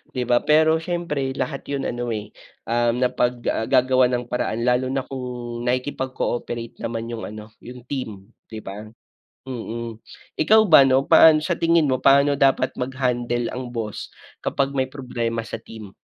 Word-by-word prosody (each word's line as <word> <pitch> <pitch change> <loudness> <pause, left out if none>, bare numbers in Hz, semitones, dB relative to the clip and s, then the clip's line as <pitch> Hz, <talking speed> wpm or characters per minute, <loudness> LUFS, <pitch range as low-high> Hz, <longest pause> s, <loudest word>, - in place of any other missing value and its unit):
'di 125 - 0
ba. 120 0 +3
Pero 160 +1 +4
siyempre 160 -6 -3
lahat 140 -1 -4
'yon 140 -1 -3
ano, 120 0 -3
eh, 105 -2 -4 0.3
um, 120 +2 +1
napag 125 0 +1 0.2
ah, 110 - -2
gagawa 130 -1 +4
ng 120 0 -5
paraan 115 -2 -1
lalo 125 +1 +2
na 135 0 -2
kung 125 -2 -6
nakikipag 130 +1 -2
cooperate 120 -1 -4
naman 115 -1 -4
yung 115 - -5
ano, 105 +1 -10
yung 125 0 -11
team 115 -6 -6 0.2
'di 110 -1 -9
ba? 105 +2 -8 0.6
Mm, 115 -3 -6 0.4
ikaw 215 +7 +5
ba 140 -3 +8
'no 130 0 +3
paano 155 +2 +6
sa 175 +1 -1
tingin 165 -3 +3
mo 130 - +1
paano 140 +1 +4
dapat 135 -1 +3
maghandle 125 -2 -1
ang 125 -1 -6
boss, 110 -3 -4 0.3
kapag 140 0 -1
may 130 -2 0
problema 120 -4 -4
sa 110 - -6
team? 110 -3 -11
125 Hz, 165 wpm, -22 LUFS, 115-135 Hz, 0.6 s, ba